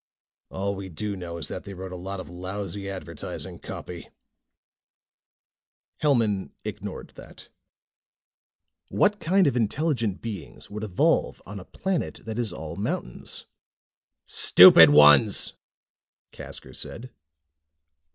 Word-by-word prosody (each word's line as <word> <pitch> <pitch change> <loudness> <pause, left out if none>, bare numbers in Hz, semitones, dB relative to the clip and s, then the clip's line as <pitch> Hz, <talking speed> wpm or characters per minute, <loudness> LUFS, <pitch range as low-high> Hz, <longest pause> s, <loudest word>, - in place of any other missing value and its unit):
"All 100 +1 -3
we 95 0 -7
do 100 +5 -4
know 85 -2 -7
is 85 - -6
that 90 - -6
they 100 -1 -9
wrote 95 0 -8
a - - -6
lot 95 +2 -6
of - - -8
lousy 95 +2 -6
advertising 85 -5 -7
copy." 85 -2 -8 1.9
Hellman 115 -10 +1 0.2
ignored - - -7
that. - - -14 1.4
"What 205 0 +2
kind 190 +3 +3
of 140 -4 +1
intelligent 120 - 0
beings 105 -7 -8
would 105 +1 -6
evolve 100 -4 +1
on 100 +1 -8
a 90 - -11
planet 190 -2 -3
that 110 +1 -5
is 115 -5 -1
all 80 -3 -7
mountains?" 60 - -4 0.8
"Stupid 85 -3 +8
ones!" 75 -1 +6 0.8
Casker - - -9
said. 125 +2 -8
100 Hz, 115 wpm, -25 LUFS, 90-115 Hz, 1.9 s, Stupid